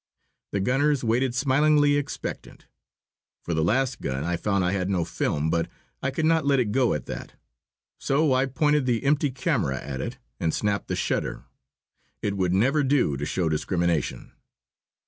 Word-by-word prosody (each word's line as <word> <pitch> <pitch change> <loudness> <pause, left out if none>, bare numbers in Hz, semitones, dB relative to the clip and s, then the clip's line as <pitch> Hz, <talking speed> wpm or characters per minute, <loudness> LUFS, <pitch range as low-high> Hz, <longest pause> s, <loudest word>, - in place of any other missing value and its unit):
The 100 - -1
gunners 135 +6 +2
waited 120 +2 +1
smilingly 145 +2 +3
expectant. 145 -1 -5 0.8
For 85 - -3
the 80 -1 +1
last 130 +8 +1
gun 65 +2 -2
I 85 +2 -1
found 100 +1 0
I 90 - +1
had 95 -1 -1
no 90 -4 0
film, 75 +2 -1
but 85 0 0 0.3
I 140 - 0
could 145 +4 -1
not 160 0 +3
let 140 -1 +3
it 115 -5 0
go 125 - +2
at 75 - -5
that. - - -7 0.7
So 145 0 +2
I 130 +1 +2
pointed 145 +1 +1
the 120 -2 +1
empty 145 +1 +2
camera 125 - -1
at 65 0 -5
it 125 +2 -5 0.2
and 80 - 0
snapped 105 -1 -1
the - - -2
shutter. - - -2 0.8
It 100 -1 -1
would 95 -2 0
never 130 +11 +3
do 135 - +2
to 70 +3 -3
show 90 -3 0
discrimination. 85 +1 -1
120 Hz, 170 wpm, -25 LUFS, 90-140 Hz, 0.8 s, smilingly